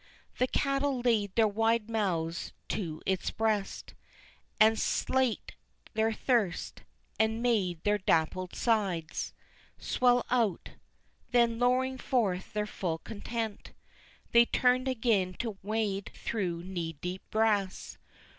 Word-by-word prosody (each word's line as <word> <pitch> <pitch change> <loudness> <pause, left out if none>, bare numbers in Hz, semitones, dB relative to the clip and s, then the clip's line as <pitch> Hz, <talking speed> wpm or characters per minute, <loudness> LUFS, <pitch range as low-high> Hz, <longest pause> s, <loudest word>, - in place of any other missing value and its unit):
The 255 - +3
cattle 275 0 0
laid 215 -5 +1
their 225 -1 +5
wide 225 +1 +1
mouths 175 -7 -1 0.2
to 160 -6 -3
its 190 -2 0
breast 215 -3 -1 0.7
And 220 0 +6
slaked 260 -3 0 0.4
their 220 +1 +2
thirst, 220 -5 0 0.4
and 220 +1 +2
made 190 -9 +1
their 210 0 +2
dappled 180 +1 0
sides 195 -9 0 0.5
Swell 245 -1 +2
out; 230 -8 +1 0.6
then 235 -2 +3
lowing 255 +1 +2
forth 200 -9 0
their 210 0 0
full 180 -5 -3
content 220 +3 -5 0.6
They 235 0 +7
turned 255 +1 +2
again 220 -7 +1
to 215 -2 -4
wade 205 -2 -1
through 175 -6 -3
knee 175 -3 -4
deep 180 +5 -5
grass. 210 -3 0
215 Hz, 115 wpm, -30 LUFS, 185-235 Hz, 0.7 s, They